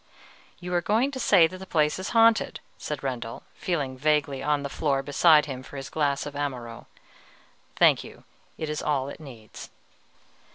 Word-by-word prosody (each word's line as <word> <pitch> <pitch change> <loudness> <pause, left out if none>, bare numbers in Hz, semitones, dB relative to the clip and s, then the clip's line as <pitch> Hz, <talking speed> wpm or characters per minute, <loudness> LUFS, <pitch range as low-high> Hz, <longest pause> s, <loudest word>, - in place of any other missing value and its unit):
"You 180 0 -6
are 175 - +2
going 225 - +1
to 265 - -6
say 195 -8 +5
that 185 +3 -5
the 190 - -10
place 150 0 +1
is 185 - -4
haunted," 230 -1 +3 0.2
said 150 -2 -5
Rendel, 120 -4 -5
feeling 145 -7 -3
vaguely 145 -2 +1
on 145 0 0
the - - -2
floor 140 -2 -1
beside 150 +2 +5
him 130 -3 -6
for 140 - -11
his 135 0 -7
glass 145 -3 0
of 145 - -6
Amaro: 125 -5 -5 0.9
"thank - - +4
you; - - -13 0.3
it 155 - -4
is 150 0 -3
all 140 -3 -1
it - - -9
needs." 120 -8 -11
150 Hz, 175 wpm, -26 LUFS, 135-170 Hz, 0.9 s, say